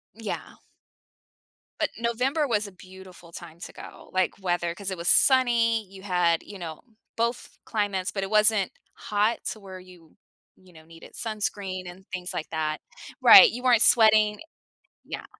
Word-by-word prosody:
Yeah. 220 -2 -5 1.3
But - - 0
November 250 +6 0
was 215 -4 0
a 200 - -12
beautiful 185 -2 -15
time 170 -1 -11
to - - -9
go, - - -13
like, 185 0 0
weather, 175 -2 -1
'cause 200 +1 -6
it 190 - -4
was 170 +1 -3
sunny, 235 -4 +3
you 190 0 -14
had, 180 -4 +1
you 200 - -11
know, 160 -3 -8 0.3
both 235 +1 -3
climates, 205 -4 -2
but 195 - -3
it 195 - -4
wasn't 215 -2 +3 0.2
hot 210 +2 -1
to 215 - -8
where 190 -2 -10
you, 180 -3 -18 0.4
you 185 -1 -21
know, 160 -1 -16
needed 165 0 -15
sunscreen 200 -4 -4
and 190 +2 -16
things 180 0 -5
like 155 - -5
that. 155 -1 -2 0.4
Right, 480 - +9
you 250 - -7
weren't 245 -3 +4
sweating 215 -2 +5 0.6
Yeah. - - -7
195 Hz, 160 wpm, -25 LUFS, 180-220 Hz, 1.3 s, Right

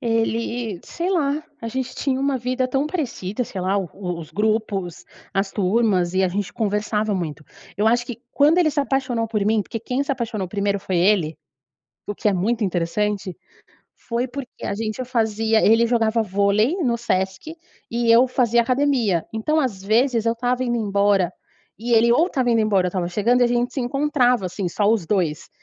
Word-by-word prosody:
ele 230 -2 -1
sei 345 +3 -3
lá. 300 -4 0 0.2
A 230 - -4
gente 255 +2 -4
tinha 265 -2 -1
uma 275 0 0
vida 255 +1 -1
tão 270 +3 0
parecida, 250 - -3
sei 190 - -6
lá, 190 +2 0
o 190 -3 -3 0.3
os 160 -2 -9
grupos, 210 -4 -1 0.3
as 195 0 -1
turmas 190 -3 +1
e 190 0 +3
a - - +2
gente 195 +1 -3
conversava 210 0 -1
muito. 155 -5 -4 0.3
Eu 210 +2 +1
acho 240 +1 +3
que 240 -1 -7
quando 300 +5 +4
ele 320 -3 +4
se 290 - 0
apaixonou 260 -5 -1
por 210 -3 -1
mim 215 0 +2
porque 225 - -6
quem 250 +4 -2
se 280 - -4
apaixonou 225 -7 -3
1º 200 0 -1
foi 185 -2 -2
ele, 175 -4 +2 0.7
o 205 - -3
que 210 - 0
é 205 - +2
muito 215 +5 0
interessante, 190 +1 -1 0.6
foi 240 +1 -3
porque 255 0 -8
a - - -2
gente 220 +3 -3
fazia 225 -2 +1
ele 225 +2 +5
jogava 230 -1 +2
vôlei 200 - +2
no 235 -2 +1
Sesc 190 - -2 0.3
e 235 0 +1
eu 240 +3 +6
fazia 240 -2 +2
academia. 250 - +1
Então 305 +8 0
às 230 -9 -2
vezes 230 +2 +2
eu 230 - +2
estava 245 +2 -1
indo 240 -1 0
embora, 200 -4 +2 0.5
e 235 +2 -1
ele 235 +1 +5
ou 320 +8 +4
estava 260 -8 0
indo 230 - +3
embora 200 -4 +2
eu - - 0
estava 175 -1 -2
chegando 215 +7 +2
e - - +5
a - - +2
gente 245 +1 0
se - - -2
encontrava 250 -4 +1
assim 180 +1 -4
só 200 +4 -1
os 220 -7 0
2. 170 -6 -1
225 Hz, 190 wpm, -22 LUFS, 200-250 Hz, 0.7 s, eu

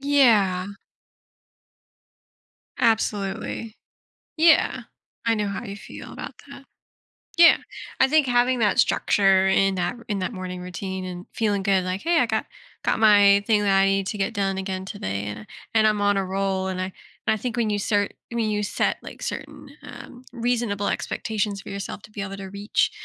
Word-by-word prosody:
Yeah. 220 -10 +3 2.1
Absolutely. 220 0 -1 0.6
Yeah. 325 0 +4 0.5
I 230 - +4
know 210 -2 -1
how 200 +3 -5
you 200 -3 -7
feel - - -10
about - - -7 0.2
that. - - -11 0.7
Yeah. 335 -1 +8 0.4
I 265 - +6
think 300 0 +3
having 245 +1 +2
that 210 -3 +2
structure 195 -1 +3
in 195 0 +3
that 180 +5 -1
in 205 -2 -1
that 185 +5 -3
morning 185 -2 -6
routine 185 +1 -5
and 180 0 -7
feeling 205 -3 0
good 195 -2 +2
like, 185 +1 -3
"Hey, 335 +1 +2
I - - +4
got - - -1 0.4
got - - +1
my 205 -2 +6
thing 215 -2 +3
that 195 -1 +3
I 195 - +5
need 195 0 +1
to 210 - -3
get 195 - -1
done 195 -1 -1
again 190 -1 -3
today, 100 - -4
and 105 +1 -6 0.3
and 220 -1 +4
I'm 210 -1 +1
on 205 0 +3
a 195 - 0
roll." 190 0 -1
and 185 -1 -3
I - - -1 0.4
and 220 - +4
I - - -1
think 240 +2 -4
when 230 -2 +1
you 205 -1 0
start 205 0 0 0.2
when 230 -2 0
you 210 0 0
set, 200 - 0
like, - - -11
certain, - - -6
um, 250 0 -11
reasonable 230 -4 -1
expectations 210 -2 -2
for - - -11
yourself 200 0 -6
to 215 - -14
be 210 - -6
able 195 0 -5
to 195 -1 -7
reach, 200 +2 0
200 Hz, 180 wpm, -24 LUFS, 190-220 Hz, 2.1 s, Yeah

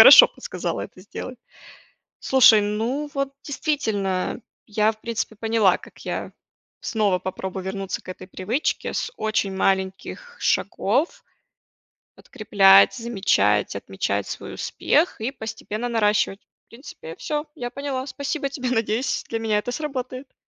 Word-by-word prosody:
хорошо - - +12
подсказала - - -4
это - - -8
сделать. 235 +5 -8 0.8
Слушай, 240 -5 +7
ну 230 +8 -1
вот 275 -1 -1
действительно, 220 - -1 0.3
я, 215 +1 +2
в 215 - -21
принципе, 230 -1 -3
поняла, 220 -3 +3
как - - -15
я - - -3 0.5
снова 205 -5 +1
попробую 190 0 -5
вернуться 195 0 -4
к - - -20
этой 185 0 -9
привычке 210 +10 -2
с 475 - -2
очень 210 -3 -1
маленьких 190 - -1
шагов. 330 - 0 0.9
Подкреплять, 195 -2 +5
замечать, 190 - +1
отмечать 100 0 -2
свой - - -6
успех 315 -5 +1
и 225 - 0
постепенно 220 -2 -5
наращивать. 210 -3 +2 0.3
В - - -54
принципе, 230 - -10
всё, 300 0 -2
я 245 -3 -5
поняла. 270 0 -4
Спасибо 280 +1 -3
тебе. 255 -3 -3
Надеюсь 230 +2 0
для 230 - -1
меня 220 -2 +1
это 245 - -4
сработает. 260 -2 -5
220 Hz, 130 wpm, -23 LUFS, 195-260 Hz, 0.9 s, хорошо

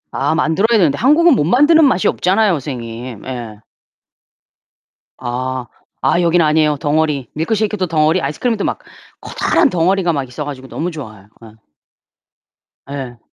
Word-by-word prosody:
아 140 +4 -1
만들어야 200 +8 +2
되는데 150 -7 +2
한국은 300 +5 +5
못 185 - +1
만드는 295 - +5
맛이 190 -10 +2
없잖아요 195 +3 +2
선생님. 120 -5 -7
예. 120 -5 -7 1.6
아. 130 0 -4 0.3
아 175 - +2
여기는 170 0 +3
아니에요. 150 -1 +2
덩어리. 150 -3 -1
밀크셰이크도 205 +3 -1
덩어리. 160 +2 +2
아이스크림도 205 - -2
막 - - -2 0.4
커다란 - - +1
덩어리가 180 -2 +1
막 135 -4 -3
있어 135 +4 -6
가지고 135 -2 -8
너무 175 +5 -4
좋아요. 110 -10 -10 0.2
예. 110 -1 -14 1.4
예. 130 -4 -6
155 Hz, 330 characters per minute, -17 LUFS, 130-190 Hz, 1.6 s, 한국은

